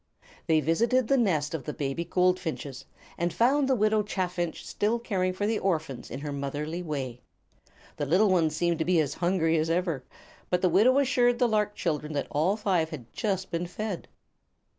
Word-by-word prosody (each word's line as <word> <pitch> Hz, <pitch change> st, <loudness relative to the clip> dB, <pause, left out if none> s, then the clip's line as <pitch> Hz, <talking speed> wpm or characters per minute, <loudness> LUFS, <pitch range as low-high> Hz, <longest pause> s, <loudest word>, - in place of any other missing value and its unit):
They 160 Hz, -2 st, +4 dB
visited 230 Hz, +10 st, +2 dB
the 275 Hz, -, +5 dB
nest 155 Hz, -9 st, +1 dB
of 160 Hz, -5 st, -3 dB
the 150 Hz, -, -4 dB
baby 140 Hz, +2 st, -2 dB
goldfinches, 175 Hz, -6 st, -1 dB, 0.3 s
and 170 Hz, +1 st, 0 dB
found 265 Hz, -, +3 dB
the 265 Hz, -, +4 dB
Widow 215 Hz, -1 st, +3 dB
Chaffinch 180 Hz, -4 st, -3 dB
still 215 Hz, +3 st, 0 dB
caring 190 Hz, -6 st, -1 dB
for 190 Hz, +3 st, -2 dB
the 220 Hz, 0 st, 0 dB
orphans 160 Hz, -8 st, -2 dB
in 135 Hz, -, -6 dB
her 150 Hz, 0 st, -4 dB
motherly 145 Hz, +4 st, -3 dB
way. 135 Hz, -7 st, -4 dB, 0.8 s
The 145 Hz, -, -2 dB
little 190 Hz, +8 st, +4 dB
ones 160 Hz, -4 st, +2 dB
seemed 170 Hz, 0 st, 0 dB
to -, -, +2 dB
be 180 Hz, -2 st, +3 dB
as 145 Hz, -3 st, 0 dB
hungry 170 Hz, -2 st, +1 dB
as 160 Hz, +1 st, 0 dB
ever, 165 Hz, -5 st, 0 dB, 0.5 s
but 180 Hz, 0 st, 0 dB
the 185 Hz, -, +5 dB
widow 220 Hz, +10 st, +5 dB
assured 245 Hz, -3 st, +3 dB
the 245 Hz, -, +3 dB
lark 210 Hz, -2 st, 0 dB
children 150 Hz, -2 st, -2 dB
that 140 Hz, -2 st, -1 dB
all 175 Hz, +8 st, +1 dB
five 185 Hz, -7 st, +1 dB
had 130 Hz, -8 st, -9 dB
just 190 Hz, -4 st, -2 dB
been 170 Hz, +1 st, -2 dB
fed. 200 Hz, 0 st, -5 dB
175 Hz, 185 wpm, -28 LUFS, 155-210 Hz, 0.8 s, the